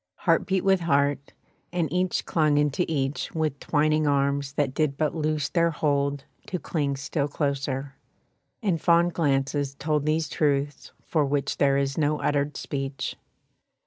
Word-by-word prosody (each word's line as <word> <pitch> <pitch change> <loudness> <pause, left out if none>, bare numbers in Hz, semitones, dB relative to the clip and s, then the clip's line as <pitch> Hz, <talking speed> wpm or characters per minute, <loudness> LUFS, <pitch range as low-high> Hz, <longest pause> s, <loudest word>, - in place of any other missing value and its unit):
Heart - - +1
beat 190 -1 +1
with 195 -1 +4
heart, 140 -3 +1 0.4
and 175 -2 0
each 180 0 0
clung 155 -3 +2
into 150 +4 +1
each 140 -2 -2
With 155 -3 -1
twining 155 0 +1
arms 140 0 +1
that 145 -2 0
did 145 -1 0
but 155 -1 0
loose 155 -2 -1
their 170 +2 +2
hold 140 -3 0 0.2
To 185 - -2
cling 145 -5 -2
still 140 +1 -2
closer; 140 -2 -2 0.7
and 180 -6 0
fond 170 0 +4
glances 140 -2 0
told 150 +1 -1
These 155 +1 +1
truths 145 -1 -1
for 155 -3 +1
which 140 0 -1
there 140 -1 +3
is 135 +1 -1
no 150 0 +1
uttered 145 0 0
speech. 135 -1 -4
145 Hz, 150 wpm, -26 LUFS, 140-160 Hz, 0.7 s, with